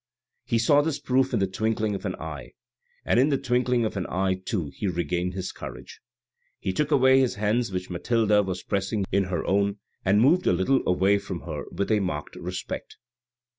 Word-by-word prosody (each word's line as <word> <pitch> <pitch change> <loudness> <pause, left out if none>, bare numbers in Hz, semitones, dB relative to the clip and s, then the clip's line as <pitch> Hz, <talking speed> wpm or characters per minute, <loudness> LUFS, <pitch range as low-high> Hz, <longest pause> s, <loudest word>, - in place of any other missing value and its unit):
He 115 - +1
saw 145 +6 +4
this 150 -1 -1
proof 130 +1 +1
in 120 - +1
the 95 - +2
twinkling 110 +2 -1
of 100 0 -5
an 90 - -2
eye, 75 -4 -8 0.5
and - - +3
in 135 +4 +4
the 140 - +2
twinkling 125 -2 +1
of 110 - -3
an 95 -3 -2
eye 95 0 0
too, 85 -8 -2
he 105 - -2
regained 90 +1 -1
his 95 -1 -4
courage. - - -10 0.6
He 95 - -3
took 150 +8 0
away 130 0 +5
his 130 -5 +1
hands 105 +2 0
which 90 0 -4
Mathilde 105 +2 +2
was 90 -1 -4
pressing 100 +1 -1
in 100 0 +2
her 90 -3 -3
own, 100 +1 +1 0.3
and 100 +2 +3
moved 160 +10 +4
a - - +5
little 110 +10 +2
away 95 +3 +3
from 95 -4 -6
her 75 -1 -5
with 100 - -2
a 110 - +4
marked 75 -6 -3
respect. - - -6
100 Hz, 200 wpm, -26 LUFS, 95-120 Hz, 0.6 s, away